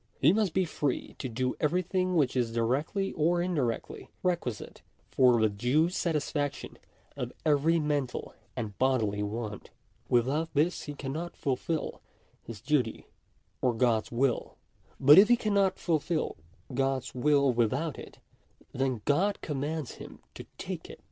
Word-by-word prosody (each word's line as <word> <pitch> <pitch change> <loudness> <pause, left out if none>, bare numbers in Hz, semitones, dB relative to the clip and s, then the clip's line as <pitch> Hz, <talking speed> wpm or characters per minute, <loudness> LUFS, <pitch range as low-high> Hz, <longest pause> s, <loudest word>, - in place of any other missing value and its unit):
He 150 +6 +5
must 205 -5 +1
be 185 -1 +3
free 145 -4 -2
to 130 - -4
do 125 +2 -1
everything 180 +3 0
which 140 -6 +2
is 120 -3 +1
directly 135 - 0
or 170 +3 +2
indi 175 -4 0
rectly 115 -2 -3 0.2
requisite 170 - -2 0.3
for 125 -3 +5
the 110 - +4
due 125 +11 +1
satisfaction 150 -5 -2 0.4
of - - -4
every 155 +2 +3
mental 145 -4 -2 0.2
and 110 -5 -4
bodily 115 -6 +1
want. 105 0 -4 0.4
Without 135 +7 +2
this 160 +5 +1
he 145 - -6
cannot 155 +6 -5
fulfil 155 +3 -2 0.4
his 115 -3 -9
duty 130 -4 0 0.6
or 125 -2 +2
God's 115 -2 +1
will. 125 +1 0 0.4
But 145 +6 +9
if 205 - +7
he 240 - +5
cannot 200 -4 +1
fulfil 165 -1 -1 0.4
God's 135 0 -1
will 140 0 +3
without 130 +7 0
it, - - -11 0.5
then 130 -4 -1
God 190 +8 +2
commands 150 0 -3
him - - -10 0.2
to - - -10
take - - -6
it. - - -10
140 Hz, 140 wpm, -29 LUFS, 125-165 Hz, 0.6 s, But